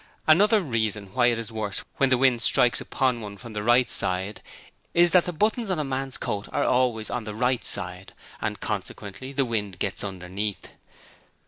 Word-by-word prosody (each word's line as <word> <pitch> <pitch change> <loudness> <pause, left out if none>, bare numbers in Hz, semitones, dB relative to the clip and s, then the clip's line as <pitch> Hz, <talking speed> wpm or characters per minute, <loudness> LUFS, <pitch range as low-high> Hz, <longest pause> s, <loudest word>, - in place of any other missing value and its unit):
Another 205 +7 +5
reason 110 - -2
why 125 -1 +4
it 120 -1 +2
is 115 0 -5
worse 110 -3 -3
when 135 - +3
the 130 - +4
wind 125 -2 +3
strikes 120 +1 +3
upon 125 -3 0
one 100 -1 -7
from 115 +2 -10
the 105 - -3
right 120 +3 +4
side 95 +2 -1 0.5
is 175 0 +6
that 180 -1 +5
the 180 - -2
buttons 215 +5 0
on 185 - +1
a 155 - 0
man's 135 -1 -2
coat 100 0 -4
are - - +1
always 125 -4 +1
on 120 - -2
the 105 -1 -6
right 125 +1 +1
side, 90 0 -4 0.3
and - - -2
consequently 100 +7 -5
the 140 -1 +1
wind 105 -5 -3
gets 100 -2 -2
underneath. 95 +1 -4
120 Hz, 190 wpm, -25 LUFS, 105-135 Hz, 0.5 s, is